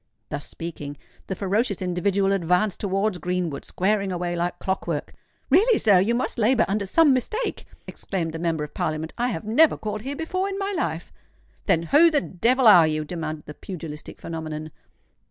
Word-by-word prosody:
Thus 145 0 -5
speaking, 150 -4 -7 0.3
the 190 - -3
ferocious 200 +2 0
individual 190 +2 +1
advanced 185 +2 +1
towards 195 -1 0
Greenwood, 175 -4 -2
squaring 200 +1 0
away 175 -1 -2
like 175 +1 -2
clock 190 0 -3
work. 155 -4 -3 0.4
"Really, 425 - +5
sir—you 205 +2 +4
must 245 0 -2
labour 230 +1 +3
under 200 0 -1
some 300 - +5
mistake," 430 - -2 0.2
exclaimed 165 -5 -4
the 165 - -5
Member 165 -2 -1
of 150 - -8
Parliament. 155 +1 -3
"I 245 - +2
have 190 -10 -3
never 290 +9 +4
called 215 -1 -4
here 275 +5 -5
before 370 +5 -2
in 390 - -4
my 400 0 -2
life." 165 - -3 0.5
"Then 165 - +3
who 300 - +6
the 305 -3 +2
devil 245 +5 +1
are 180 -7 +8
you?" 155 0 -1
demanded 155 -2 -5
the 150 - -8
pugilistic 155 -3 -8
phenomenon. 155 -1 -6
190 Hz, 175 wpm, -24 LUFS, 165-230 Hz, 0.5 s, are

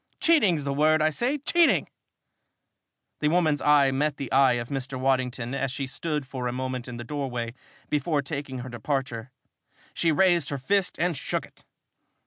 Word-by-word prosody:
Cheating's 210 - +3
the 140 0 -2
word, 155 +2 +3
I 155 0 +2
say 245 - 0
cheating!" 330 +4 +3 1.3
The 150 - +1
woman's 155 -2 +2
eye 145 -2 +5
met 145 +2 0
the 135 - -6
eye 135 -1 +5
of 120 -1 -3
Mr. 135 -1 -4
Waddington 130 -2 0
as 135 -1 -1
she 135 +1 -3
stood 150 +2 -3
for 130 -1 -4
a - - -1
moment 130 0 -4
in 125 -1 -7
the 120 - -6
doorway 125 -3 -4 0.3
before 150 0 0
taking 140 -2 -5
her - - -7
departure. 120 -1 -3 0.6
She 165 - +1
raised 175 +1 +3
her 140 - -2
fist 190 +8 0
and 175 0 0
shook - - -3
it. - - -22
140 Hz, 170 wpm, -26 LUFS, 130-155 Hz, 1.3 s, eye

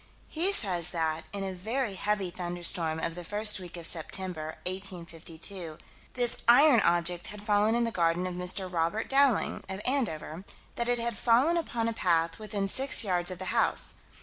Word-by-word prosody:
He 345 +5 +1
says 180 - +3
that, 160 -2 -2
in 200 +1 -4
a 190 -1 -4
very 220 +5 -3
heavy 195 -1 -2
thunderstorm, 175 -2 0
of 165 +1 -3
the 175 +1 -8
first 210 +3 +1
week 180 -1 -9
of 170 - -5
September, 160 -1 +2
1852, 175 -2 -3 0.4
this 245 -2 0
iron 250 +1 +6
object, 175 -1 +1
had 210 0 -9
fallen 210 +1 +2
in 235 - +2
the 230 - -1
garden 170 -1 0
of 185 - -4
Mr. 180 +2 -2
Robert 175 +5 -2
Dowling, 270 -3 +2
of 190 0 -4
Andover; 190 - -1 0.3
that 240 0 -2
it 245 - +2
had 235 -2 -2
fallen 255 +8 +3
upon 240 -9 -2
a 230 - -1
path 165 -4 0
"within 210 -2 -3
six 265 +5 +4
yards 180 -3 0
of 185 - -4
the 185 +1 -4
house." - - +1
190 Hz, 175 wpm, -28 LUFS, 175-230 Hz, 0.4 s, iron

